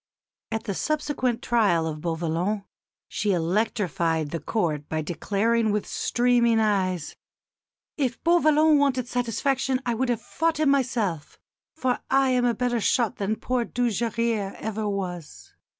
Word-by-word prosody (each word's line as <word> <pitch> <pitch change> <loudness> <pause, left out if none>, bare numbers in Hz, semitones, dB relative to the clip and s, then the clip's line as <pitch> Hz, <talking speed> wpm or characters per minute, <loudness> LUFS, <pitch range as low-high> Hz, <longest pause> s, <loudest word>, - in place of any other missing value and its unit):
At 220 0 -2
the 210 -4 -3
subsequent 290 -2 -1
trial 205 -9 +2
of 155 -1 -4
Beauvallon 170 +5 -1 0.4
she 210 -2 -1
electrified 170 -4 0
the 165 - -2
Court 155 -4 -2
by 155 0 -1
declaring 215 +7 0
with 210 0 -1
streaming 240 -2 +2
eyes, 185 -6 0 0.8
"If 255 -5 -1
Beauvallon 310 -3 +4
wanted 260 -3 +1
satisfaction 255 +2 0
I 240 - +1
would 250 +2 -1
have 240 -3 +1
fought 325 -1 -1
him 300 -3 +4
myself, 230 - -1 0.4
for 260 -5 0
I 270 -1 +3
am 250 -1 +2
a 240 -1 +2
better 240 0 0
shot 235 -1 +1
than 205 +2 -1
poor 250 +2 -1
Dujarrier 230 -3 -1
ever 215 -1 -3
was." 180 -5 -6
225 Hz, 135 wpm, -25 LUFS, 185-250 Hz, 0.8 s, Beauvallon